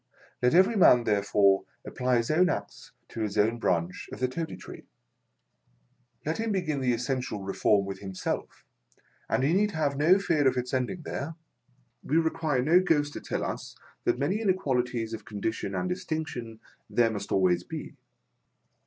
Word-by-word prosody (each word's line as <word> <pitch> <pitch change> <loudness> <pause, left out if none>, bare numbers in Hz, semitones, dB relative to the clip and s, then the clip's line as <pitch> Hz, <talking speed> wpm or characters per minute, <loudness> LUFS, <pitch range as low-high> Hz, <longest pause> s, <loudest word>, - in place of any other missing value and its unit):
Let 125 +5 +3
every 190 +6 +5
man, 125 - +6
therefore, 100 -2 +3 0.2
apply 125 -1 0
his 115 +4 0
own 180 +4 +4
axe - - -5 0.2
to 115 - -6
his 105 -1 -2
own 110 +3 +2
branch 85 -4 -1
of - - -7
the 130 - +1
Toady 160 +5 -5
Tree. - - -11 1.4
Let 155 +6 -2
him 225 0 -1
begin 160 -8 -1
the 125 -1 +2
essential 120 -3 -2
Reform 100 +1 +2
with 95 -1 -6
himself, 95 -2 -5 0.6
and - - +1
he 145 +5 +3
need 205 +2 +2
have 145 -3 0
no 165 +6 +5
fear 165 -8 +2
of 130 -1 +2
its 125 +1 -3
ending 130 +7 -1
there. 155 +2 -5 0.7
We 155 - 0
require 160 -5 +1
no 165 +6 +5
ghost 150 -5 +1
to - - -6
tell - - -3
us - - -5 0.3
that - - +2
many 170 - 0
inequalities 125 - 0
of 110 -1 -6
condition 105 -1 -3
and 90 0 -1
distinction 115 - -4 0.3
there 115 -1 +3
must 100 -2 -5
al - - +3
ways 90 -1 +3
be. - - -7
125 Hz, 170 wpm, -28 LUFS, 110-160 Hz, 1.4 s, man